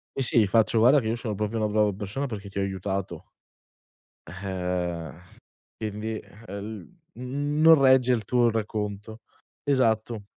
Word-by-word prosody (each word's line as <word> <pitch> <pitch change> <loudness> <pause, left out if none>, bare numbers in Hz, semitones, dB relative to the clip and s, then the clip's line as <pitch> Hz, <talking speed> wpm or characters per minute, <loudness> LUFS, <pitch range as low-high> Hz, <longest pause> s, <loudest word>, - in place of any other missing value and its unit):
Sì, 135 - 0
sì, 120 - +3
gli 105 - +4
faccio: 110 +3 +3
"Guarda 130 +6 +6
che 115 - -4
io 115 - 0
sono 115 -3 -4
proprio 105 +2 -2
una 110 -1 +1
brava 105 -1 +2
persona 105 +7 -4
perché 105 -6 -6
ti 100 - -10
ho - - +1
aiutato" 95 -2 -3 1.0
eh, 90 -3 -3 0.7
quindi, 110 0 -4 0.3
ehm, 100 +2 -7 0.3
l - - -10
"non 145 +5 +4
regge 130 -2 +5
il 115 -3 -1
tuo 120 +1 +3
racconto". 105 0 -4 0.4
Esatto. 115 -6 +1
110 Hz, 150 wpm, -26 LUFS, 100-120 Hz, 1.0 s, Guarda